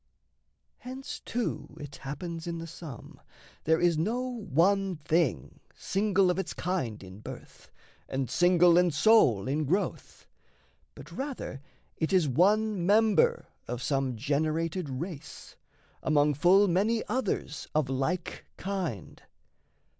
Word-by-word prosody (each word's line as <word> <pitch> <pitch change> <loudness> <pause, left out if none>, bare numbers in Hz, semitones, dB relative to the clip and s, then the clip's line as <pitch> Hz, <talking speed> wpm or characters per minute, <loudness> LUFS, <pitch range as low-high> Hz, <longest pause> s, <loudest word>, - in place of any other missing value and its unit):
Hence 260 +2 -7
too 240 -1 -4
it 145 -1 -8
happens 165 +4 -6
in 170 -1 -3
the 165 - -6
sum 160 -6 -10 0.4
there 160 +1 +3
is 175 -3 +2
No 220 +9 0
one 195 - +1
thing 155 - -1 0.2
single 195 -2 +2
of 180 - -2
its 190 - -4
kind 160 - -2
in 95 +1 -11
birth, - - -11 0.4
And 135 -1 -2
single 175 +3 +5
and 180 -1 +3
sole 140 - +4
in 150 +3 0
growth, 185 +9 -2 0.7
but - - -12
rather 265 - -5 0.4
it 160 - -1
is 185 -5 +3
One 200 - +2
member 210 +2 +3 0.2
of 125 +1 -4
some 135 -3 0
generated 155 - -1
race, 145 +3 -7 0.5
Among 150 -1 +3
full 185 +8 +5
many 205 +6 +1
others 225 - -2
of 155 -3 +2
like 140 +7 -2
kind. 180 - -4
170 Hz, 125 wpm, -29 LUFS, 145-195 Hz, 0.7 s, single